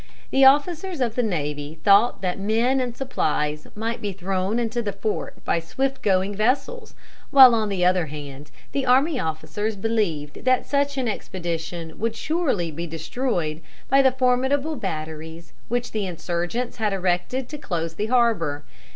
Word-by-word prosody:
The 270 0 +5
officers 325 +5 +3
of 240 -4 0
the 245 - +1
navy 150 -7 -3
thought 200 +1 +4
that 180 +1 -1
men 230 +6 +2
and 245 -1 -4
supplies 150 - -1
might 225 +2 -3
be 205 - -2
thrown 190 +2 -1
into 240 0 -1
the 210 -3 -2
fort 210 +2 -4
by - - +1
swift 265 +11 -2
going 190 0 +1
vessels, 275 - -1 0.3
while 265 -4 +9
on 220 -2 +1
the 185 -3 0
other 180 -2 +3
hand 145 -1 -8 0.2
the 275 - -1
army 265 +3 +3
officers 205 +7 -3
believed 195 -9 -2
that 255 -1 +2
such 280 0 0
an 260 -2 0
expedition 170 -5 -4
would 225 +1 -1
surely 265 - -1
be 170 +3 -5
destroyed 165 - -2 0.3
by 275 +1 +6
the 265 -1 +4
formidable 265 +4 +1
batteries 160 - -6
which 245 +1 -2
the 210 -3 -2
insurgents 175 +8 -3
had 215 -3 0
erected 190 +7 -1
to 300 - -7
close 165 - -3
the 210 +6 -2
harbor. 220 - +1
210 Hz, 160 wpm, -24 LUFS, 170-255 Hz, 0.3 s, while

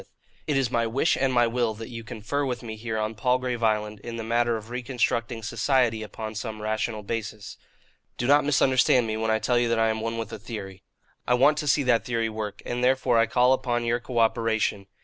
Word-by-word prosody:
It 150 - +1
is 130 -3 0
my 115 -1 +1
wish 135 +8 +2
and 135 0 +1
my 120 -1 +4
will 115 -1 0
that 115 +3 -8
you 115 -2 -7
confer 120 +5 -3
with 125 -4 -3
me 110 -2 -6
here 110 0 -4
on 110 +1 -1
Palgrave 125 +2 0
Island 105 -1 0
in 115 +2 -7
the 115 - -4
matter 115 +1 +1
of 110 +2 -11
reconstructing 120 -2 -1
society 120 -1 +1
upon 110 +1 -6
some 110 0 -5
rational 110 0 -2
basis. 110 -1 -5 0.6
"Do 120 - -2
not 145 +3 +5
misunderstand 130 -3 +3
me, 110 -1 -2
when 110 0 -1
I 110 - +3
tell 120 +2 +1
you 120 -1 +1
that 115 - +1
I 115 0 +3
am 110 0 -2
one 115 +1 -3
with 115 -2 -5
a - - -6
theory. 100 -4 -8 0.5
I 125 - +4
want 145 +4 +4
to 150 - -3
see 145 0 +3
that 125 -3 +2
theory 115 -2 -1
work, 110 -2 -6
and 120 +1 -2
therefore 130 -2 +3
I 115 - +4
call 125 +3 +4
upon 120 -2 -1
your 120 +1 +1
cooperation. 115 -4 0
115 Hz, 220 wpm, -26 LUFS, 110-125 Hz, 0.6 s, not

